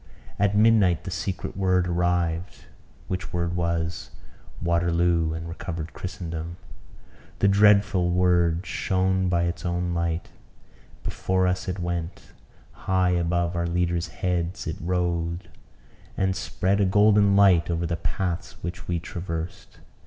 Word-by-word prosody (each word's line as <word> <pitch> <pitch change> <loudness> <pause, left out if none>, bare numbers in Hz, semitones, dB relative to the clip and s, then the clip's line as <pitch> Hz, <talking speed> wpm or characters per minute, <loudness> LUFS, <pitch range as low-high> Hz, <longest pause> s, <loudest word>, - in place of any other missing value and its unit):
At 100 0 +2
midnight 105 -6 +4
the 95 - -6
secret 90 +2 -4
word 95 -2 +2
arrived; 85 0 -1 0.4
which 90 -1 -4
word 85 0 -1
was 85 0 -2 0.5
Waterloo 85 -1 +1
and 80 +1 -6
Recovered 85 -2 -6
Christendom! 85 -2 -6 0.8
The 100 - +3
dreadful 100 -2 +4
word 90 -1 +2
shone 95 -1 0
by 85 -1 +2
its 85 -1 -2
own 90 0 -1
light; 85 -1 -2 0.7
before 95 0 0
us 90 +1 -1
it 90 0 -2
went; 85 -1 -4 0.4
high 95 -1 +1
above 85 0 0
our 85 0 0
leaders' 85 -1 0
heads 90 0 -2
it - - -4
rode, 85 -1 -2 0.7
and 95 -1 +1
spread 100 +1 0
a - - +4
golden 105 +1 +4
light 95 -4 +5
over 85 0 -1
the 85 0 -1
paths 85 -3 -3
which 90 +3 -6
we 85 - 0
traversed. 85 0 -6
90 Hz, 130 wpm, -25 LUFS, 85-95 Hz, 0.8 s, light